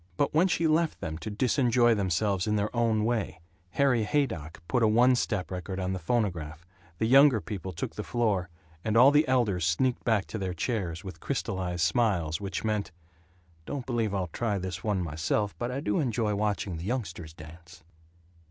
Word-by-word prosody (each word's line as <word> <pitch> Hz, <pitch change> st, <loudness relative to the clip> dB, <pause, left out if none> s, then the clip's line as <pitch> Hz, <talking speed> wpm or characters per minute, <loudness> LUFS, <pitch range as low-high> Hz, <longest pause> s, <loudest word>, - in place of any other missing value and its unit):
But 140 Hz, -, +1 dB
when 165 Hz, +5 st, +4 dB
she 170 Hz, -2 st, 0 dB
left 160 Hz, +1 st, +1 dB
them 80 Hz, 0 st, -5 dB
to 110 Hz, -, -5 dB
disenjoy 120 Hz, +1 st, +3 dB
themselves 95 Hz, 0 st, 0 dB
in 105 Hz, -, +1 dB
their 105 Hz, +3 st, -1 dB
own 115 Hz, -2 st, +2 dB
way 110 Hz, -7 st, -1 dB, 0.3 s
Harry 135 Hz, -5 st, +3 dB
Haydock 105 Hz, -, -2 dB
put 125 Hz, -, +1 dB
a 110 Hz, -, +5 dB
one 120 Hz, +4 st, +5 dB
step 100 Hz, -7 st, -1 dB
record 95 Hz, +1 st, -5 dB
on 95 Hz, 0 st, -1 dB
the 95 Hz, -, -3 dB
phonograph, 85 Hz, -5 st, -2 dB, 0.3 s
the 110 Hz, -, 0 dB
younger 135 Hz, 0 st, +6 dB
people 95 Hz, -3 st, -6 dB
took 85 Hz, -, -5 dB
the 105 Hz, -, -5 dB
floor, 105 Hz, -7 st, 0 dB, 0.3 s
and 110 Hz, 0 st, +1 dB
all 130 Hz, +4 st, +8 dB
the 150 Hz, +1 st, +4 dB
elders 115 Hz, -9 st, +1 dB
sneaked 105 Hz, +10 st, +1 dB
back 110 Hz, -5 st, +1 dB
to 110 Hz, -, -4 dB
their 95 Hz, -2 st, -3 dB
chairs, 85 Hz, -2 st, -2 dB
with 95 Hz, -2 st, -8 dB
crystallized 95 Hz, -9 st, -2 dB
smiles 85 Hz, -4 st, +1 dB
which 95 Hz, -3 st, -4 dB
meant, 105 Hz, -3 st, -1 dB, 0.8 s
"Don't 140 Hz, -4 st, -4 dB
believe 115 Hz, -4 st, -1 dB
I'll 90 Hz, -4 st, -2 dB
try 110 Hz, -4 st, -1 dB
this 90 Hz, -2 st, -5 dB
one 100 Hz, -4 st, 0 dB
myself, 85 Hz, +6 st, -1 dB
but 120 Hz, -, -2 dB
I 125 Hz, +2 st, -3 dB
do 105 Hz, -4 st, 0 dB
enjoy 115 Hz, -6 st, 0 dB
watching 100 Hz, -4 st, -1 dB
the 85 Hz, -, -7 dB
youngsters 95 Hz, -9 st, -4 dB
dance." 80 Hz, +2 st, -13 dB
105 Hz, 185 wpm, -28 LUFS, 90-120 Hz, 0.8 s, all